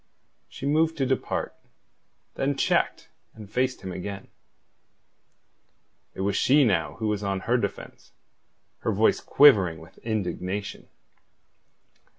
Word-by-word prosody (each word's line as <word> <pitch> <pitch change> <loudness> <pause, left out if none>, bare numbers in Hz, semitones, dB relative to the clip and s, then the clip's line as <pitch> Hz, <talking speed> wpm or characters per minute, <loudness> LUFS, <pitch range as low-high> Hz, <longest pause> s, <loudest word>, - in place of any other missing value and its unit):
She - - -8
moved 160 +3 +2
to 135 - +1
depart, 130 0 -2 0.8
then 140 +1 -1
checked, - - 0 0.3
and 110 -2 -11
faced 125 +5 -1
him 95 - -6
again. 95 +2 -7 1.9
It - - -5
was 100 +1 0
she 140 +6 +4
now 110 -7 +1
who 110 - -3
was 105 -1 -1
on 100 -2 -2
her 120 +5 +1
defence, 100 -5 -6 0.7
her - - -1
voice 110 +2 +3
quivering 100 - +5
with 80 +3 -15
indignation. 100 -2 -4
105 Hz, 120 wpm, -26 LUFS, 95-130 Hz, 1.9 s, quivering